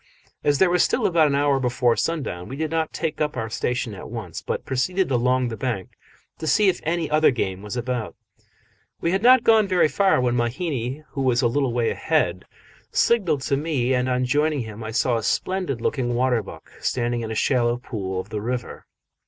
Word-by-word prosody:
As 145 Hz, -1 st, +3 dB
there 185 Hz, +2 st, +4 dB
was 180 Hz, -, +3 dB
still -, -, +1 dB
about 165 Hz, -3 st, +4 dB
an 140 Hz, -, +1 dB
hour 140 Hz, -1 st, +2 dB
before 125 Hz, -2 st, +1 dB
sundown, 135 Hz, -, -2 dB
we 135 Hz, -, -5 dB
did 155 Hz, +1 st, -3 dB
not 160 Hz, -1 st, -1 dB
take 160 Hz, -1 st, -3 dB
up 150 Hz, -2 st, -1 dB
our 115 Hz, -2 st, -3 dB
station 125 Hz, -1 st, -2 dB
at 95 Hz, -, -9 dB
once, 110 Hz, -8 st, -6 dB
but -, -, -4 dB
proceeded 175 Hz, +7 st, 0 dB
along 125 Hz, 0 st, +2 dB
the 115 Hz, -, -5 dB
bank 110 Hz, -4 st, -3 dB, 0.5 s
to 160 Hz, -, -4 dB
see 205 Hz, +4 st, +4 dB
if 180 Hz, -, -1 dB
any 165 Hz, 0 st, -1 dB
other 155 Hz, +1 st, +4 dB
game 95 Hz, -7 st, -2 dB
was 105 Hz, +3 st, -6 dB
about. 120 Hz, -3 st, -3 dB, 0.8 s
We 170 Hz, -, 0 dB
had 190 Hz, +1 st, +1 dB
not 250 Hz, +1 st, +6 dB
gone 220 Hz, -3 st, +5 dB
very 185 Hz, -4 st, +3 dB
far 195 Hz, -1 st, +2 dB
when 125 Hz, -1 st, +1 dB
Mahina, 130 Hz, +2 st, -2 dB
who 135 Hz, -, -4 dB
was 130 Hz, -1 st, +2 dB
a -, -, +5 dB
little 130 Hz, +2 st, 0 dB
way 120 Hz, -1 st, 0 dB
ahead, -, -, 0 dB, 0.5 s
signalled 185 Hz, -12 st, +2 dB
to 135 Hz, +1 st, 0 dB
me, 140 Hz, -4 st, 0 dB
and 125 Hz, 0 st, +1 dB
on 125 Hz, 0 st, +1 dB
joining 145 Hz, +2 st, +1 dB
him 110 Hz, -1 st, -7 dB
I 110 Hz, -, -5 dB
saw 120 Hz, +1 st, +1 dB
a 115 Hz, -, -4 dB
splendid 175 Hz, -, -1 dB
looking 120 Hz, -2 st, -1 dB
water 125 Hz, -1 st, +2 dB
buck -, -, -12 dB
standing 120 Hz, -1 st, -1 dB
in 115 Hz, -, -4 dB
a 110 Hz, -, -4 dB
shallow 120 Hz, 0 st, +2 dB
pool 100 Hz, -7 st, -4 dB
of -, -, -7 dB
the 105 Hz, -, -4 dB
river. 120 Hz, +2 st, -5 dB
130 Hz, 210 wpm, -23 LUFS, 120-155 Hz, 0.8 s, not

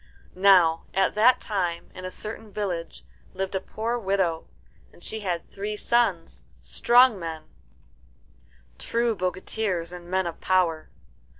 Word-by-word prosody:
Now, 180 Hz, -4 st, +5 dB
at 195 Hz, 0 st, +2 dB
that 225 Hz, +4 st, +5 dB
time 175 Hz, -5 st, -3 dB
in 185 Hz, -, -8 dB
a -, -, -3 dB
certain 215 Hz, +2 st, -7 dB
village 180 Hz, -5 st, -4 dB, 0.3 s
lived 190 Hz, +1 st, -3 dB
a 190 Hz, -, 0 dB
poor 230 Hz, +4 st, -3 dB
widow, 190 Hz, -5 st, 0 dB, 0.4 s
and 175 Hz, -, -18 dB
she 220 Hz, -, -4 dB
had 180 Hz, -5 st, -3 dB
three 210 Hz, +2 st, -4 dB
sons, 210 Hz, -8 st, 0 dB, 0.2 s
strong 245 Hz, -3 st, +4 dB
men, 160 Hz, -2 st, -5 dB, 1.4 s
true 235 Hz, -1 st, 0 dB
bogatirs 185 Hz, -1 st, -2 dB
and 175 Hz, -1 st, -10 dB
men 190 Hz, 0 st, +1 dB
of 170 Hz, -1 st, -6 dB
power. 175 Hz, -4 st, +1 dB
190 Hz, 130 wpm, -25 LUFS, 175-215 Hz, 1.4 s, Now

